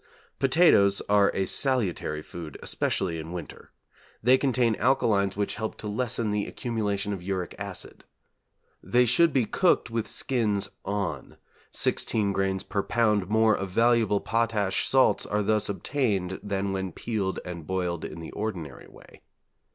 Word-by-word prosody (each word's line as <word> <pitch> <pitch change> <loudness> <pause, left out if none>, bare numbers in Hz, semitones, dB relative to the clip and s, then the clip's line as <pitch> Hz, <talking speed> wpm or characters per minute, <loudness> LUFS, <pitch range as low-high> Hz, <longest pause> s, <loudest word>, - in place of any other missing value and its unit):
Potatoes 130 - +5
are 100 -1 +5
a 95 - +1
salutary 95 - -1
food, 80 -4 -8
especially 85 -4 -1
in 80 +1 -7
winter. 90 -3 -8 0.5
They 125 +3 +6
contain 130 -4 +2
alkalies 105 -6 +2
which 105 - -1
help 110 - -3
to 105 - -6
lessen 115 0 -1
the 105 -1 -1
accumulation 105 -4 -2
of 95 - -6
uric 90 -1 -3
acid. - - -7 0.8
They 125 +1 +3
should 165 +7 +4
be 130 -5 +2
cooked 175 - +2
with 115 -1 -2
skins 105 -6 0
on: 95 -9 -3 0.3
16 105 -3 0
grains 95 -1 0
per 100 - -1
lb. 105 -3 +1
more 110 0 +4
of 100 -1 -4
valuable 115 0 +3
potash 110 -4 0
salts 130 -1 +3
are 105 0 0
thus 105 0 +1
obtained 100 -4 -1
than 100 -1 -2
when 95 -2 -3
peeled 105 -5 -2
and 85 -3 -7
boiled 90 -3 -2
in 85 - -6
the 80 - -8
ordinary 100 -7 -5
way. - - -17
105 Hz, 145 wpm, -27 LUFS, 95-115 Hz, 0.8 s, They